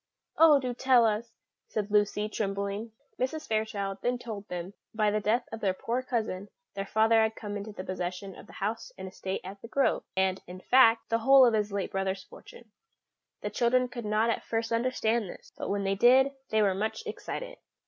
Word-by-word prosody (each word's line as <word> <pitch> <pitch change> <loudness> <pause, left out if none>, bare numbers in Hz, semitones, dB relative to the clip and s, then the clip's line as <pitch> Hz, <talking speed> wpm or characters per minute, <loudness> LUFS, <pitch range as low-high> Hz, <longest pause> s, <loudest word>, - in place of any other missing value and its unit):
"Oh, 315 -3 +8
do 255 -2 -3
tell 250 -1 +4
us!" 225 +2 -1 0.4
said 210 -1 -3
Lucy, 210 0 +2
trembling. 200 +1 -3 0.3
Mrs. 305 +5 -2
Fairchild 205 -3 -2
then 245 0 0
told 215 -4 -7
them 175 0 -5
that, 215 - -24
by 210 -1 +3
the 215 - +1
death 220 +4 0
of 225 - -5
their 195 -3 0
poor 240 +6 -2
cousin, 220 -6 -3 0.2
their 195 0 -4
father 225 +1 +4
had 220 0 +1
come 210 -2 -6
into 205 +1 -5
the 185 - -7
possession 185 +1 -5
of - - -13
the - - -14
house 215 +2 -3
and 190 - -7
estate 190 0 -5
at 195 +2 -9
The - - -9
Grove, 275 +3 +1
and, 190 0 +1
in 180 +1 -9
fact, 230 +1 +5
the 230 - +2
whole 270 +3 +7
of 235 - +3
his 210 -1 0
late 200 -1 -2
brother's 195 0 -2
fortune. 235 -3 -15 0.7
The 210 - -4
children 250 +3 +2
could 245 -2 -7
not 215 +2 +2
at - - -3
first 225 0 -2
understand 230 -3 0
this, - - -12
but - - -5
when 200 0 -1
they 195 0 +1
did, 255 +6 +5 0.2
they 220 -1 +3
were 195 -2 +3
much 215 - -3
excited. - - -6
215 Hz, 205 wpm, -29 LUFS, 200-235 Hz, 0.7 s, Oh